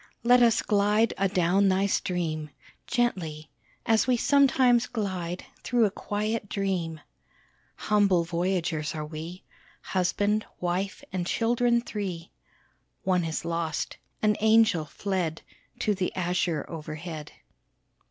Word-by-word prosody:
Let 245 +1 +6
us 235 -2 +4
glide 210 +2 +2
adown 190 0 +3
thy 190 +1 +2
stream 165 -5 -1 0.4
Gently 165 -11 -1 0.3
as 225 +2 +3
we 250 -1 +3
sometimes 255 -3 +4
glide 185 -5 -3 0.2
Through 240 -2 +3
a 205 - 0
quiet 210 +1 -3
dream! 180 -6 -2 0.7
Humble 200 -5 +2
voyagers 170 -2 -1
are 155 -1 -3
we, 160 +4 -8 0.4
Husband, 205 +3 +1 0.2
wife, 180 +2 -2
and 180 -2 -2
children 235 +2 +2
three 190 -7 -5 0.7
(One 180 -2 +2
is 165 0 -3
lost 165 -2 -2 0.3
an 210 -1 +3
angel, 220 -6 +4
fled 175 0 -3 0.4
To 210 - +2
the 185 -2 -1
azure 175 -3 0
overhead!) 155 -1 -7
185 Hz, 115 wpm, -27 LUFS, 170-215 Hz, 0.7 s, Let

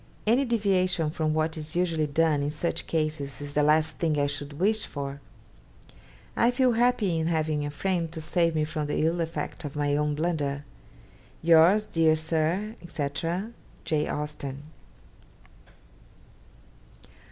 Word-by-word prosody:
Any 240 +6 +3
deviation 185 -8 +1
from 155 -1 -1
what 155 0 0
is 155 +1 -6
usually 165 -3 +1
done 155 0 +2
in 145 - -1
such 155 +3 -3
cases 155 -3 -2
is 145 0 -7
the 150 - +2
last 155 +2 +2
thing 155 -3 +1
I 145 - +3
should 145 0 -4
wish 210 +8 +1
for. 140 0 -6 1.1
I 235 - +4
feel 250 0 +3
happy 230 -7 +2
in 160 - 0
having 155 -2 0
a 145 - -2
friend 170 +1 -1
to 165 - -6
save 165 +1 +1
me 155 - +2
from 155 -1 -3
the 150 - 0
ill 170 +1 +1
effect 165 0 -4
of 145 -1 -6
my 145 -1 +1
own 150 0 0
blunder. 145 -3 -1 0.8
'Yours, 170 +5 +6
dear 165 -6 +3
Sir, 165 +7 -1
&c. 145 -4 -2 0.8
'J. 150 -1 0
AUSTEN.' 145 -2 -5
160 Hz, 145 wpm, -27 LUFS, 150-175 Hz, 1.1 s, Yours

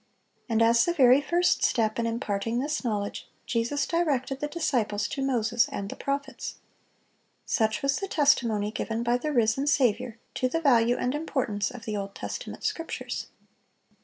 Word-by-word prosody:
And 225 0 +3
as 230 +1 +5
the 345 - 0
very 260 -2 +6
first 345 +4 +2
step 220 -1 +1
in 230 - +1
imparting 230 -1 -2
this 290 +4 -1
knowledge, 205 -4 -3 0.2
Jesus 250 +5 0
directed 280 -6 0
the 295 - -2
disciples 245 -10 0
to 275 - -4
"Moses 240 -3 +1
and 200 0 -4
the - - -6
prophets." 275 -1 -4 0.9
Such 220 +1 0
was 275 0 +2
the 390 - -3
testimony 235 - +2
given 225 +1 -3
by 240 +1 +1
the 305 +3 -2
risen 240 +2 +2
Saviour 245 -4 +1 0.2
to 255 - 0
the 330 - 0
value 245 -6 +4
and 250 - -1
importance 255 -9 -1
of 245 -3 -10
the 215 -1 -2
Old 195 0 -5
Testament - - -6
Scriptures. 330 0 -3
245 Hz, 160 wpm, -27 LUFS, 225-280 Hz, 0.9 s, very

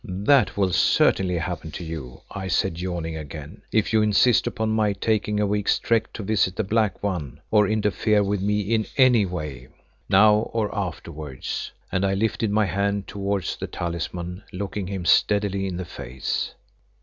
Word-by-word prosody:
"That 105 +5 +2
will 95 -2 +2
certainly 90 +1 +3
happen 85 -1 -4
to - - -6
you," 80 -7 -7
I 95 -1 -5
said, 85 -1 0
yawning 85 -3 -3
again, 75 0 -8
"if 110 0 +1
you 110 - +5
insist 105 +3 +4
upon 110 0 -1
my 110 -2 +2
taking 105 +1 0
a 105 - +2
week's 105 0 +1
trek 115 -1 0
to 110 - -6
visit 100 -3 +1
the 110 - 0
Black 105 -1 0
One, 90 -10 -3
or 105 -2 +5
interfere 105 0 +2
with 100 -1 -1
me 105 +1 +1
in 110 +2 0
any 125 -6 +5
way 75 -8 -6 0.4
now 105 +2 +5
or 110 -2 -1
afterwards," 80 -7 -5 0.2
and 95 - 0
I 95 0 +2
lifted 110 +1 0
my 105 +1 +2
hand 100 0 -1
towards 100 -1 -2
the - - -4
talisman, 85 +2 -4
looking 100 0 -4
him 95 -2 -4
steadily 100 0 +3
in 90 -2 -4
the 90 - -4
face. 65 -4 -4
100 Hz, 170 wpm, -24 LUFS, 90-105 Hz, 0.4 s, you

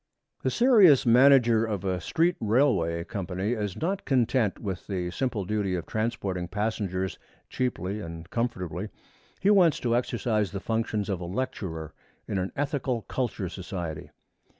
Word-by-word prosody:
The 130 - +1
serious 200 - +6
manager 120 -2 +6
of 105 -4 -3
a 90 -2 -1
street 170 - +1
railway 105 - +2
company 95 +2 -3
is 105 -5 -2
not 190 +5 -1
content 120 -5 +1
with 95 -4 -5
the 90 -3 -2
simple 110 -1 -2
duty 100 -2 -1
of 85 -3 -4
transporting 100 -5 -2
passengers 100 -2 -2 0.3
cheaply 105 -6 -2
and 85 -2 -8
comfortably. 100 -5 -2 0.5
He 200 - +4
wants 180 -7 +5
to 120 -1 +1
exercise 115 -4 0
the 100 - -3
functions 110 -1 -1
of 95 -3 -2
a - - -4
lecturer 85 - -4 0.3
in 100 - -1
an 95 +1 -2
ethical 140 -5 -1
culture 120 -7 -3
society. 85 -3 -6
105 Hz, 145 wpm, -27 LUFS, 95-125 Hz, 0.5 s, serious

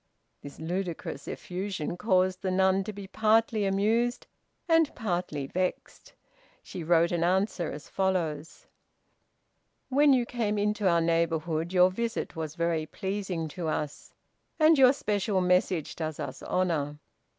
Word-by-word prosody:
This 145 - -11
ludicrous 170 -4 -4
effusion 180 -3 -4
caused 185 -1 +1
the 190 - -1
nun 190 +1 +2
to 215 - -4
be 200 -1 -8
partly 220 +1 +2
amused 220 +5 +1 0.4
and 325 -3 +4
partly 175 - -2
vexed. 185 +6 -4 0.5
She 175 - -7
wrote 170 +1 +3
an 170 -1 0
answer 185 -1 0
as 150 - -9
follows: 170 -5 -2 1.2
"When 285 +2 +5
you 250 -3 +3
came 225 -4 -2
into 210 0 0
our 170 -1 +3
neighborhood 165 0 0
your 180 0 +5
visit 230 0 -3
was 160 -1 -5
very 170 -2 -1
pleasing 190 -3 -3
to 170 +2 -5
us, 150 -2 -4 0.4
and 315 +1 +6
your 260 -3 +7
special 205 -6 0
message 180 -2 +1
does 155 -2 -4
us - - -6
honor. 155 -5 -1
185 Hz, 135 wpm, -28 LUFS, 165-210 Hz, 1.2 s, your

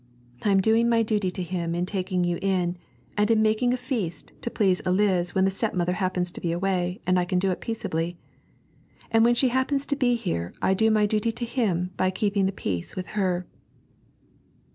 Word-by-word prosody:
I 210 - +1
am 195 -1 +4
doing 225 +3 +3
my 230 -1 +3
duty 210 -3 0
to 180 0 -4
him 170 -1 -3
in 175 +1 0
taking 185 -1 -1
you 175 0 0
in, 185 -3 0 0.4
and 210 +1 +2
in 220 -1 +4
making 220 +3 +2
a 250 - +1
feast 245 - -4
to - - -3
please 190 -5 +2
Eliz 185 -2 +1
when 190 0 +4
the 195 - +2
stepmother 185 -4 -1
happens 180 -1 -1
to - - -9
be 170 - -1
away 180 0 -1
and 185 0 +3
I - - +2
can 180 0 0
do 190 +1 +2
it 180 - -4
peaceably. 175 -7 -3 0.9
And 225 0 +5
when 240 +1 +4
she 255 +1 +3
happens 260 +3 0
to 285 - -1
be 250 -3 +2
here 170 - -3
I 190 - +2
do 220 +3 +3
my 215 -1 +3
duty 215 +2 +1
to 240 - -4
him 190 -8 -1
by 185 - +2
keeping 200 0 +1
the - - 0
peace 90 - -4
with 185 0 -5
her.' 185 -3 0
190 Hz, 210 wpm, -25 LUFS, 180-220 Hz, 0.9 s, And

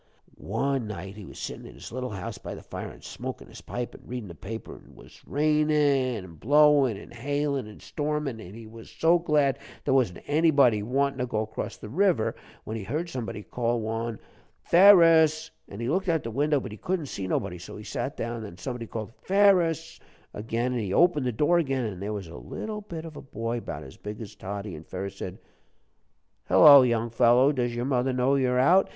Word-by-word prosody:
"One 125 +3 -1
night 95 -1 -7
he 105 -2 -9
was - - -12
sittin' - - -6
in - - -13
his - - -10
little 125 +1 -4
house 95 -4 -6
by - - -7
the - - -11
fire, - - -6
an' - - -14
smokin' - - -7
his - - -12
pipe 120 0 -5
an' - - -13
readin' 120 -5 -6
the - - -8
paper, 110 +7 -7
an' - - -15
'twas - - -16
rainin' 145 -5 +2
an' 85 -3 -13
blowin' 145 - +4
an' 105 - -12
hailin' 140 +1 -2
an' 105 - -13
stormin', 150 -6 -3
an' 95 +2 -10
he 115 0 -10
was 115 +1 -12
so 170 +2 +3
glad 145 -5 +2 0.3
there 135 - +2
wasn't 120 -10 +1
anybody 140 -8 +4
wantin' 135 +5 0
to 125 - -1
go 110 -2 -1
'cross 110 - -6
the - - -9
river, 170 - +1 0.3
when 110 - -5
he 110 - -6
heard 155 - -3
somebody 110 -6 -5
call 120 +1 -1
one 115 0 -3 0.5
'Ferus!' 165 -4 +6 0.2
An' 100 - -9
he 115 - -3
looked 185 +6 0
out 165 -4 +1
the 115 - -5
window, 145 +4 +2
but 120 - -7
he 105 - -9
couldn't 180 -4 -2
see 95 -8 -5
nobody, 90 -2 -2
so 90 - -9
he 105 - -9
sat 135 +5 -4
down 115 +1 -3
again. 115 - -6
Then 100 -5 -9
somebody 120 -1 -5
called 110 0 -6
'Ferus!' 180 -5 +3 0.3
again, 115 +4 -2
and 125 -2 -1
he 100 -3 -3
opened 150 - +3
the - - +1
door 150 +9 +3
again, 135 -6 -1
an' 100 -5 -5
there 100 +2 -4
was 100 -3 -4
a 80 - -11
little 210 - -6
bit 165 -5 -7
of 160 -2 -9
a - - -8
boy, 115 -2 -4
'bout 75 - -6
as 65 - -12
big 105 0 -7
as 110 -3 -8
Toddie. 100 0 -6
An' 75 - -10
Ferus 95 +3 -6
said, 90 - -6 1.1
'Hello, 140 - +9
young 120 -2 +1
fellow, 120 +3 +5
does 120 -4 -1
your 120 +1 -2
mother 130 -1 +1
know 125 +2 +2
you're 130 -2 +2
out?' 175 +9 +5
125 Hz, 215 wpm, -27 LUFS, 110-150 Hz, 1.1 s, Hello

